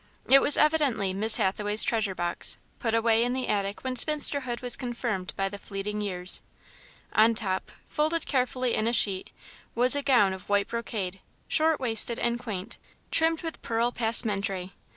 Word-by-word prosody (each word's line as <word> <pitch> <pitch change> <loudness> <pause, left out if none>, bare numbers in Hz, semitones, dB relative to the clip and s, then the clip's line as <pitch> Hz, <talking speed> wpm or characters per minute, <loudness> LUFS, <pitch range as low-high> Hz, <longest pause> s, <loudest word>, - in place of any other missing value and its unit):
It 275 +1 +6
was 290 - +6
evidently 290 -11 +1
Miss 215 +3 +3
Hathaway's 205 +2 +2
treasure 215 -5 -1
box, 175 -1 -2 0.2
put 230 -3 -1
away 230 0 +2
in 245 +1 -1
the 260 0 -3
attic 200 -1 -2
when 260 -1 -3
spinsterhood 280 -3 +2
was 245 -1 +1
confirmed 235 -7 -4
by 195 - -1
the 200 +1 -8
fleeting 210 +1 -5
years. 185 -3 +1 0.7
On 225 +1 +4
top, 190 -5 -4 0.2
folded 310 +2 -1
carefully 255 -2 -1
in 215 - 0
a 235 - 0
sheet, 195 -4 0 0.5
was 250 +4 +4
a 285 - 0
gown 245 -9 +3
of 190 +1 -11
white 200 0 +1
brocade, 210 -5 -5 0.3
short 315 0 +2
waisted 230 -1 +4
and 235 0 -1
quaint, 220 -3 -7 0.3
trimmed 325 0 +1
with 325 -1 -6
pearl 230 +1 -1
passementerie. 200 -5 0
230 Hz, 165 wpm, -26 LUFS, 200-255 Hz, 0.7 s, It